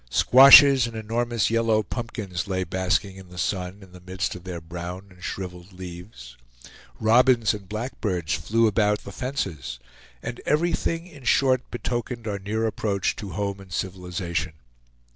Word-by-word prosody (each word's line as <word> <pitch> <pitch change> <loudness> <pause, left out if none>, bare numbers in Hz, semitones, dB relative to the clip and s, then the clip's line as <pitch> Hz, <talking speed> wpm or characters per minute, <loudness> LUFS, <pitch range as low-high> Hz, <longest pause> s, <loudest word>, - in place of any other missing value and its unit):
Squashes 135 - +8
and 115 - -9
enormous 115 +1 -1
yellow 115 -2 +2
pumpkins 105 -5 -5
lay 95 -1 -1
basking 95 +2 -1
in 95 -2 -13
the 90 - -13
sun 95 +2 -3
in 95 - -16
the 90 0 -14
midst 95 +1 -3
of 90 0 -11
their 90 -2 -5
brown 90 +3 -7
and 90 0 -17
shriveled 90 -1 -6
leaves. 90 - -10 0.6
Robins 120 0 +4
and 100 -3 -9
blackbirds 105 -7 -3
flew 110 +8 +1
about 105 -1 +2
the 100 - -8
fences; 85 - -4 0.5
and - - -6
everything 165 +1 0
in 150 -7 -14
short 130 0 +2
betokened 120 -1 -4
our 100 -2 -2
near 110 +3 -2
approach 105 -3 -1
to 100 -5 -7
home 100 +1 -3
and 95 -1 -14
civilization. 90 -2 -3
100 Hz, 150 wpm, -24 LUFS, 90-115 Hz, 0.6 s, Squashes